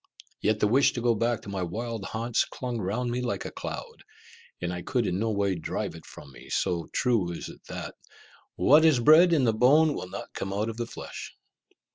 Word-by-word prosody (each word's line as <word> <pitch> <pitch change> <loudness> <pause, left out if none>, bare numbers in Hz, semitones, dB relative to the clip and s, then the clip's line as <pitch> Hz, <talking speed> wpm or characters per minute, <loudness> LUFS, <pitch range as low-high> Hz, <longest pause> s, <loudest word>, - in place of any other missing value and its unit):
Yet 110 0 +1
the 105 - +3
wish 130 +6 +4
to 120 - -3
go 120 0 +3
back 115 +1 -1
to - - -9
my 100 -1 -3
wild 110 +4 -4
haunts 115 +1 0
clung 125 -2 -5
round 110 +5 -2
me 125 +1 -1
like 120 -7 -3
a - - -5
cloud, - - -7 0.6
and 90 0 -3
I 90 - -4
could 120 +5 -1
in 90 0 -1
no 115 +1 0
way 100 -2 +1
drive 85 -3 -3
it - - -12
from 70 - -12
me, 65 - -14
so 85 -3 -1
true 115 -9 +1
is 85 - -6
it - - -13
that - - -6 0.6
"what 150 +4 +5
is 155 -6 +5
bred 155 +8 +7
in 155 -5 +3
the 115 -3 +3
bone 145 +7 +5
will 90 - -6
not 95 - -8
come 95 0 -4
out 105 +3 -1
of 115 - -6
the 120 -1 -3
flesh." - - -8
115 Hz, 220 wpm, -27 LUFS, 100-125 Hz, 0.6 s, bred